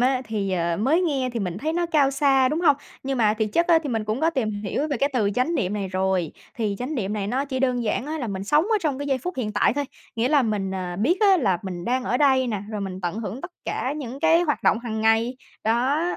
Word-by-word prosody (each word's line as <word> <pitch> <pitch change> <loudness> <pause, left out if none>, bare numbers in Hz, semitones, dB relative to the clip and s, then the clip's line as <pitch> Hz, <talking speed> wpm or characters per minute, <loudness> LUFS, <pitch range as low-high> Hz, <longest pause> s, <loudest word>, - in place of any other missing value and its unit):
á, 255 +1 +2
thì, 205 -3 -2
ờ, 170 -1 0
mới 275 - +2
nghe 275 -8 0
thì 230 - -2
mình 180 -1 -3
thấy 310 +7 -2
nó 345 0 0
cao 290 -4 +3
xa, 270 -2 +3
đúng 310 +4 -1
hông? 290 -5 +5 0.3
Nhưng 270 -1 -2
mà 215 -2 +3
thiệt 220 -1 -1
chất 340 0 +2
á, 335 -2 +6
thì 290 - -4
mình 225 -3 -1
cũng 215 +6 -2
có 325 +1 +3
tìm 255 -8 -1
hiểu 290 +9 -2
về 285 - -1
cái 275 +4 +1
từ 210 -5 +1
chánh 255 +9 +1
niệm 190 - 0
này 200 -2 -2
rồi. 185 -3 0 0.2
Thì 215 -4 -2
chánh 265 +5 -3
niệm 210 -5 -2
này 205 -2 -2
nó 260 +6 -1
chỉ 260 -2 -3
đơn 250 -2 +1
giản 240 +4 -1
á 315 +1 -3
là 250 - -3
mình 195 -1 -4
sống 300 +8 +3
ở 440 +1 +2
trong 290 -5 0
cái 285 - -4
giây 270 -2 +1
phút 360 +8 -5
hiện 220 -5 -2
tại 205 - +3
thôi, 285 - -1 0.3
nghĩa 230 +3 +1
là 290 -3 +4
mình, 210 -4 -1
ờ, 180 -2 -4
biết 310 - +1
á 400 -3 +6
là 190 -7 +2
mình 180 -3 -5
đang 255 +3 0
ở 245 - +1
đây 265 -2 +3
nè, 210 -5 -2
rồi 210 -2 -4
mình 190 -1 -5
tận 175 +3 -3
hưởng 225 +4 -5
tất 355 - -7
cả 265 - -2
những 270 -2 -6
cái 325 +2 +4
hoạt 295 -4 -1
động - - +3
hằng 225 -2 -4
ngày. 225 +3 +2 0.3
Đó. 250 +8 +2
250 Hz, 280 wpm, -24 LUFS, 210-285 Hz, 0.3 s, á